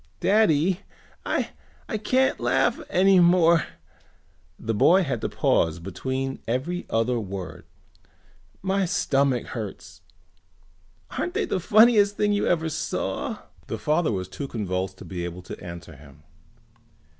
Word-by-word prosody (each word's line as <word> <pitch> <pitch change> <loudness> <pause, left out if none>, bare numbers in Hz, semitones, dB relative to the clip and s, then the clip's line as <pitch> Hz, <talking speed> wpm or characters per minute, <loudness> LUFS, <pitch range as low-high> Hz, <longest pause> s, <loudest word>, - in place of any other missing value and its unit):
"Daddy, 190 -4 +3 0.5
I - - -1 0.5
can't 260 +4 +2
laugh - - +1
any 190 +1 +5
more," 170 -2 +5 0.9
the 115 - -3
boy 180 - +5
had 135 -8 -3
to - - -2
pause 80 0 +1
between 130 +9 -4
every 150 +10 -2
other 115 +2 +1
word. 95 -3 -7 1.0
"My 195 0 +1
stomach 135 -7 +1
hurts. 110 -5 -7 1.2
Aren't 355 - -2
they 440 -1 +1
the 195 - -1
funniest 210 +1 +5
things 205 0 +2
you 205 - 0
ever 165 -2 +1
saw?" 155 - -3 0.2
The - - -3
father 155 -2 +1
was 95 -3 -3
too 140 +8 -6
convulsed 95 -5 -3
to - - -11
be 90 -2 -5
able 85 +1 -6
to - - -9
answer 85 -2 -9
him. 70 +1 -17
140 Hz, 130 wpm, -25 LUFS, -, 1.2 s, any